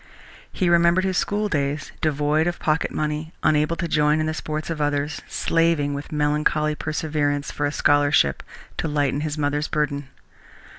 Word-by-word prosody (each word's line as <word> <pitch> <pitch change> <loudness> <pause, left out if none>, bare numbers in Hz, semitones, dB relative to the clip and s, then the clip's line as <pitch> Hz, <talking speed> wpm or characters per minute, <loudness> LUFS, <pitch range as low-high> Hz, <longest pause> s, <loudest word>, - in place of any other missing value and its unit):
He 185 - 0
remembered 170 +1 +4
his 190 -2 +1
schooldays, 155 -9 -1
devoid 150 +1 +1
of 175 - -1
pocket 155 0 0
money, 155 +1 -3
unable 150 +1 +2
to 170 +1 -3
join 150 -1 +2
in 155 - 0
the 155 - -1
sports 155 +1 -4
of 155 -2 -3
others, 145 +1 -1
slaving 165 -3 +1
with 140 +1 -6
melancholy 150 0 +1
perseverance 150 -2 -2
for 145 - -1
a - - -2
scholarship 145 - +3 0.4
to - - -1
lighten 145 -2 0
his 155 0 -3
mother's 145 0 0
burden. 145 -2 -1
150 Hz, 155 wpm, -23 LUFS, 145-160 Hz, 0.4 s, remembered